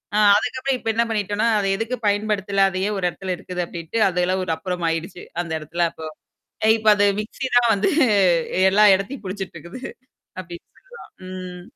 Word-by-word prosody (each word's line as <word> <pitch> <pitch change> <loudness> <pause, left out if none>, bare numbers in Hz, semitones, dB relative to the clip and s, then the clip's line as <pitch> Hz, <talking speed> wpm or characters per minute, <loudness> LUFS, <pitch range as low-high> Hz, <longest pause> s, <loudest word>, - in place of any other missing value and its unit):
அ - - +2 0.2
அதுக்கு 240 +4 -2
அப்புறம் 265 -1 0
இப்ப 225 - -4
என்ன 235 +1 +2
பண்ணிட்டோம்னா, 210 0 0
அது 195 - -1
எதுக்கு 225 +5 -3
பயன்படுத்தல? 200 -1 +1
அதையே 190 +2 -2
ஒரு 190 - -4
இடத்துல 185 +1 -4
இருக்குது? 180 -1 -5
அப்படின்ட்டு 170 +6 -5
அது 180 0 -1
எல்லாம் 185 +1 0
ஒரு 165 - -2
அப்புறம் 180 -1 -4
ஆயிடுச்சு. 165 +2 -4 0.2
அந்த 170 -2 -7
இடத்துல 170 +3 -1
அப்போ. 160 - -8 0.6
அ - - +4
இப்ப 215 0 0
அது 205 0 +3
மிக்ஸி 250 +5 -5
தான் 240 -1 +5
வந்து 200 - +1 0.8
எல்லா 210 +2 +5
இடத்தையும் 200 +5 -4
புடிச்சுக்கிட்டு 190 -2 -6
இருக்குது. 175 - -10 0.6
அப்படின்னு 175 -1 -10
சொல்லலாம். - - -15 0.2
ம். 185 -1 -8
195 Hz, 180 wpm, -22 LUFS, 180-215 Hz, 0.8 s, தான்